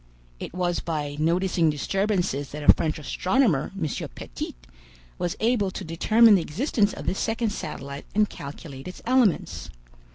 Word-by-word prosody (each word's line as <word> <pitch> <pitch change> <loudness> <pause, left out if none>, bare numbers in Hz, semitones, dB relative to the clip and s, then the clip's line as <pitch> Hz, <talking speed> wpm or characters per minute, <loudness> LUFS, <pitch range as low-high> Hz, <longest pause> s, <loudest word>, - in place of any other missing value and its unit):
It - - -6
was 175 -1 0
by 150 -3 -3
noticing 170 +1 +2
disturbances 180 -2 0
that 150 0 -6
a - - +9
French 155 -2 -2
astronomer, 180 - +1
M. 155 -5 -3
Petit, - - -6 0.6
was 175 -1 -1
able 220 -3 +2
to - - -6
determine 215 +7 +5
the 190 - +5
existence 205 - 0
of - - -8
this 190 - -1
second 225 -1 0
satellite 140 -8 -6
and 210 0 +4
calculate 140 -2 -9
its 180 - -9
elements. 245 -6 +2
180 Hz, 150 wpm, -25 LUFS, 150-210 Hz, 0.6 s, a